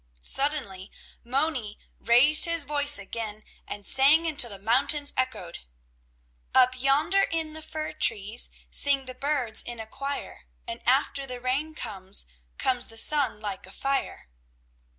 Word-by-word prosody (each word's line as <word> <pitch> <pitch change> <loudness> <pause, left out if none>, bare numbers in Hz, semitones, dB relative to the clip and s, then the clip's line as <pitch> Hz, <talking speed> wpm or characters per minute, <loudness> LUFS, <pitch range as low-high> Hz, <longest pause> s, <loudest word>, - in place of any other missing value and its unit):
Suddenly 235 - -2 0.3
Moni 255 -4 -1 0.2
raised 275 +8 +6
his 335 -2 0
voice 290 0 +1
again 215 +1 -5 0.2
and 205 -1 -7
sang 285 +7 +5
until 285 -7 +4
the 200 - -8
mountains 265 +8 +1
echoed: 255 -10 -2 1.0
"Up 255 0 +5
yonder 295 +9 +3
in 320 -2 -3
the 315 - -8
fir 310 0 -5
trees 220 -4 +1 0.2
Sing 275 -1 +1
the 255 - -7
birds 255 -4 -2
in 240 -1 -7
a 220 - -5
choir, 275 +5 -6 0.2
And 350 - -6
after 275 +1 +1
the 250 -1 -6
rain 275 +6 -2
comes, 195 -6 -2 0.3
Comes 255 -2 +2
the 225 - -10
sun 275 -3 +2
like 200 -3 -6
a - - -12
fire." 275 +6 -3
265 Hz, 140 wpm, -26 LUFS, 225-295 Hz, 1.0 s, raised